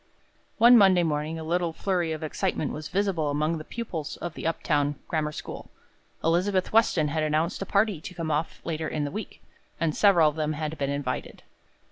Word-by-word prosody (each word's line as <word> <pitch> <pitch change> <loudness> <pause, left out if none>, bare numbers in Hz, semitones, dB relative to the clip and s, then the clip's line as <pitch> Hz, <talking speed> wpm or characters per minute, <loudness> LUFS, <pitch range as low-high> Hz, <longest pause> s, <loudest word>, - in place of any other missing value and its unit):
One 235 +1 +8
Monday 190 -3 +5
morning 155 0 -1
a 160 - -6
little 170 +1 0
flurry 175 -2 -1
of 160 0 -4
excitement 155 -1 -1
was 155 0 -6
visible 185 -6 0
among 155 +3 0
the - - -7
pupils 170 -8 -5
of 175 -2 -5
the - - -4
up 165 - -2
town 145 -1 +1
grammar 155 -2 -1
school. - - -8 0.5
Elizabeth 185 +4 +1
Weston 185 -9 +3
had 155 +2 -1
announced 155 +4 0
a 195 - -3
party 200 -5 +1
to 180 - -8
come 165 -2 -3
off 150 +2 -2
later 160 -1 -2
in 150 - -2
the 145 - -3
week, 215 0 -7 0.4
and 160 -2 0
several 180 -6 +5
of 150 - 0
them 155 0 0
had 155 +1 -3
been 140 -1 0
invited. 140 -2 -4
160 Hz, 195 wpm, -26 LUFS, 150-180 Hz, 0.5 s, One